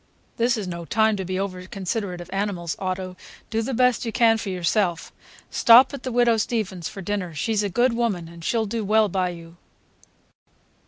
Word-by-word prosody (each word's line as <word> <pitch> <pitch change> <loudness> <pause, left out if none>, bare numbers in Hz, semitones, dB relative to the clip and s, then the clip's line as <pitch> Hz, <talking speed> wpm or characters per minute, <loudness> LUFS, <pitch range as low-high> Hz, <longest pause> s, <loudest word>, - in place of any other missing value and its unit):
"This 235 +1 +2
is 205 -3 -4
no 170 -1 -5
time 220 +4 +2
to 190 - -3
be 185 +1 -3
over 185 -2 -4
considerate 190 -1 -4
of 175 - -11
animals, 195 -4 -2
Otto; 185 -1 -3 0.4
do 225 0 0
the 225 - -3
best 250 -1 +3
you 230 - -3
can 225 0 +4
for 205 - -4
yourself. 180 -1 0 0.4
Stop 245 +4 +7
at 280 - -6
the 255 - -4
Widow 240 -1 +3
Steavens's 210 -6 -2
for 195 - -8
dinner. 185 -4 -3
She's 215 +7 0
a 205 - -1
good 240 +5 +2
woman, 220 -8 -1
and 170 0 -12
she'll 225 +4 0
do 225 +1 -3
well 215 +1 +3
by 185 -1 0
you." 170 -1 -10
200 Hz, 195 wpm, -24 LUFS, 180-225 Hz, 0.4 s, Stop